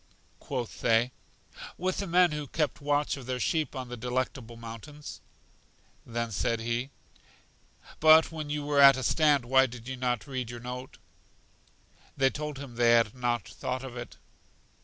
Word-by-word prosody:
Quoth 125 -4 -5
they: 115 +1 +3 0.7
With 185 +1 -1
the 200 - -3
men 180 0 +4
who 150 -1 -4
kept 150 0 -1
watch 145 0 0
of 130 -3 -10
their 130 -1 -2
sheep 155 +2 0
on 130 -1 -5
The 125 - -5
Delectable 125 0 -3
Mountains. 115 +6 -9 0.9
Then 115 0 -2
he - - -12
said: 115 +6 -1 1.1
But 160 +1 +7
when 155 -2 -5
you 150 0 -2
were 145 -1 +3
at 135 -1 +9
a 130 - -3
stand 145 -1 +3
why 130 +2 +5
did 120 -1 -10
you 130 0 -4
not 125 -3 -1
read 130 -4 -4
your 120 0 -7
note? 125 +2 -7 1.2
They 135 0 +3
told 150 -1 -5
him 135 -4 -9
they 120 -1 +5
had 115 -3 +3
not 120 -4 -1
thought 130 0 -4
of 130 -2 -8
it. 120 -1 -8
130 Hz, 165 wpm, -29 LUFS, 120-145 Hz, 1.2 s, at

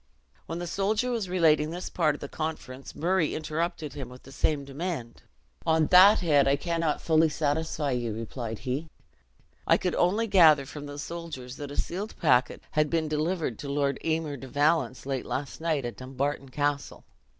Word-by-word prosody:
When 165 - -4
the 175 - -4
soldier 210 +7 0
was 220 -6 -2
relating 160 -4 +3
this 175 +2 -5
part 155 -4 +1
of - - -12
the 140 - -5
conference, 140 -4 -6
Murray 175 -1 +1
interrupted 155 -1 -3
him 135 -4 -6
with 125 0 -13
the 135 - -13
same 140 0 0
demand. 140 -4 -5 0.4
"On 160 -1 +3
that 195 +4 +8
head 145 -5 +4
I 140 - +4
cannot 165 0 -1
fully 160 0 +4
satisfy 150 -1 -1
you," 120 -2 -1
replied 115 +1 -5
he; 135 +7 -4 0.8
"I - - +6
could 180 - -1
only 205 +6 +2
gather 160 -9 +6
from 145 +1 -8
the 145 0 -8
soldiers 145 -5 -7
that 145 -2 -6
a 145 - -8
sealed 200 +5 -3
packet 130 -5 +2
had 150 -1 +2
been 165 -2 0
delivered 155 - -1
to 140 - -6
Lor 140 0 +1
Aymer 160 -3 -1
de 135 - -9
Valence 145 -2 +1
late 135 -2 -2
last 140 +3 -4
night 155 -5 0
at 120 - -5
Dumbarton 135 +2 -3
Castle. 145 +1 -2
150 Hz, 180 wpm, -28 LUFS, 140-170 Hz, 0.8 s, that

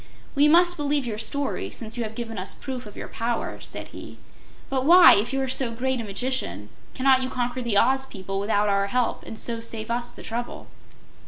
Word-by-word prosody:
"We 290 +1 +4
must 350 +3 +5
believe 290 -2 0
your 215 -3 -4
story, 280 +5 -2
since 225 -1 -6
you 240 - -3
have 220 0 -6
given 225 -3 -5
us 185 - -4
proof 255 -4 -6
of 205 - -12
your - - -6
power," 230 0 -3
said - - -8
he. - - -10 0.5
"But 265 -1 -1
why, 345 +4 +9
if 215 +5 +1
you 270 - -1
are - - -2
so 255 -1 0
great 255 +1 -1
a - - -6
magician, 195 - -3 0.3
cannot 260 0 +4
you 260 - -2
conquer 250 0 -2
the 235 -4 0
Oz 265 +4 +3
people 195 -3 -5
without 205 0 +1
our 200 0 +2
help, 245 +3 0
and 220 - -7
so 230 +1 +2
save 230 -1 -4
us 240 0 -2
the - - -12
trouble?" 240 +2 -5
240 Hz, 215 wpm, -25 LUFS, 220-265 Hz, 0.5 s, why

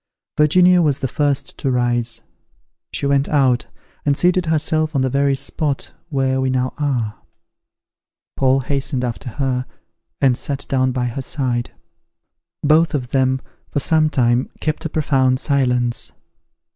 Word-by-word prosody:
Virginia 180 +4 +5
was 145 -5 +2
the 135 - -2
first 145 0 -1
to 135 - -1
rise; 120 -2 0 0.7
she - - -3
went 140 0 +2
out, 130 -4 +2 0.4
and 140 -1 +1
seated 180 -1 +2
herself 155 0 0
on 135 - +2
the 130 - 0
very 140 0 +2
spot 140 +1 -2 0.2
where 130 -2 0
we 130 - +1
now 130 0 0
are. 125 -8 -1 1.2
Paul 135 0 +3
hastened 135 -1 -2
after 125 +2 -5
her, 130 0 -2 0.5
and 130 -3 +4
sat 140 +2 -3
down 130 -1 +1
by 125 -1 -1
her 120 +3 -3
side. 125 -3 -2 0.9
Both 155 +1 +4
of 125 -3 -3
them, 130 -1 +2 0.3
for - - -1
some 155 +1 +2
time, 120 -3 +1
kept 155 +1 -2
a - - -1
profound 135 -4 +2
silence. 125 -4 0
135 Hz, 145 wpm, -20 LUFS, 125-150 Hz, 1.2 s, Virginia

